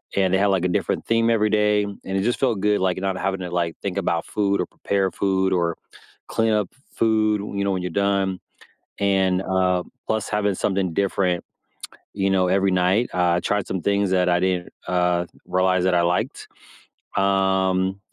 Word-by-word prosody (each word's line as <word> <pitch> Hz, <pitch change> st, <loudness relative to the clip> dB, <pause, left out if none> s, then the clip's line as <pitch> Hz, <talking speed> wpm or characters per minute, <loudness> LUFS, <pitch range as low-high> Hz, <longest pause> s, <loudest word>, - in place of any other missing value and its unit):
and 95 Hz, -2 st, +2 dB
they -, -, +4 dB
had, 100 Hz, +1 st, +2 dB
like, 95 Hz, -2 st, +1 dB
a -, -, +3 dB
different 90 Hz, -, -1 dB
theme 115 Hz, 0 st, +2 dB
every 110 Hz, -2 st, +2 dB
day, 105 Hz, -1 st, +2 dB
and 100 Hz, -1 st, -7 dB
it 95 Hz, 0 st, -1 dB
just 120 Hz, +3 st, 0 dB
felt 120 Hz, -6 st, +1 dB
good, 105 Hz, 0 st, +1 dB
like, 95 Hz, -1 st, +1 dB
not 95 Hz, 0 st, -2 dB
having 95 Hz, 0 st, -2 dB
to, 90 Hz, -, -4 dB
like, 85 Hz, -2 st, -1 dB
think -, -, -3 dB
about -, -, -1 dB
food 100 Hz, -1 st, 0 dB
or -, -, -1 dB
prepare 100 Hz, -1 st, -1 dB
food 95 Hz, -1 st, 0 dB
or 85 Hz, -2 st, 0 dB, 0.5 s
clean 115 Hz, 0 st, +1 dB
up 105 Hz, -3 st, +1 dB
f -, -, -28 dB, 0.2 s
food, 110 Hz, -2 st, +2 dB, 0.2 s
you 100 Hz, -, 0 dB
know, 100 Hz, -, 0 dB
when 95 Hz, -1 st, -1 dB
you're 90 Hz, -1 st, -4 dB
done, 100 Hz, 0 st, 0 dB, 0.6 s
and, 95 Hz, -2 st, +2 dB
uh, 95 Hz, -1 st, +1 dB, 0.2 s
plus 110 Hz, -2 st, -1 dB
having 105 Hz, -2 st, 0 dB
something 95 Hz, -2 st, -1 dB
different, 90 Hz, -2 st, 0 dB, 0.7 s
you 100 Hz, -1 st, 0 dB
know, 95 Hz, -1 st, +2 dB
every 95 Hz, +1 st, +2 dB
night. 95 Hz, +6 st, +2 dB
I 90 Hz, -1 st, +2 dB
tried 105 Hz, 0 st, -1 dB
some 95 Hz, -, -3 dB
things 100 Hz, 0 st, +1 dB
that 90 Hz, -1 st, +2 dB
I 90 Hz, 0 st, +3 dB
didn't, 90 Hz, -1 st, -1 dB, 0.2 s
uh, 90 Hz, -1 st, +1 dB, 0.2 s
realize 95 Hz, 0 st, +1 dB
that 95 Hz, -1 st, +2 dB
I 85 Hz, -, +3 dB
liked, 85 Hz, +1 st, -1 dB, 0.7 s
um, 95 Hz, -1 st, +1 dB
95 Hz, 190 wpm, -23 LUFS, 90-100 Hz, 0.7 s, they